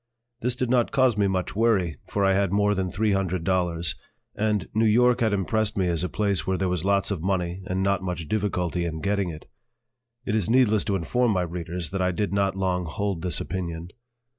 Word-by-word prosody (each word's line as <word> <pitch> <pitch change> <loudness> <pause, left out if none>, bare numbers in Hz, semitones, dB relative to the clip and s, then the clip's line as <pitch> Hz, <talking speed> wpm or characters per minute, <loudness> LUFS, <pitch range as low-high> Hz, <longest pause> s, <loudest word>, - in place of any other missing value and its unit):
This 120 +1 0
did 125 -1 -1
not 120 -2 +2
cause 130 -4 +3
me 100 -1 +2
much 95 -1 -2
worry, 100 - +2
for 100 -1 0
I 95 - +4
had 100 -1 +1
more 105 +1 +3
than 95 -2 -1
three 105 +3 0
hundred 95 -3 0
dollars, 85 -2 0 0.4
and 105 -3 0
New 110 +1 +3
York 125 +3 +4
had 110 -2 +3
impressed 105 +2 0
me 95 -2 +1
as 85 -1 0
a 90 - -1
place 100 -4 0
where 95 0 +1
there 95 -1 0
was 90 -2 -1
lots 100 +1 +2
of 95 -6 -2
money 90 0 -1
and 95 +1 -1
not 100 -1 +1
much 90 -4 -4
difficulty 90 -4 -1
in 80 -2 -4
getting 100 -2 0
it. 80 -1 -9 0.8
It - - -1
is 110 -2 0
needless 115 -4 +4
to 100 -2 0
inform 120 +8 +1
my 90 -2 +1
readers 85 0 -4
that 95 -1 -2
I 90 0 +2
did 100 +3 -2
not 100 -1 +1
long 90 -2 0
hold 95 +2 -2
this 90 0 -2
opinion. 85 -2 -4
95 Hz, 215 wpm, -25 LUFS, 90-105 Hz, 0.8 s, I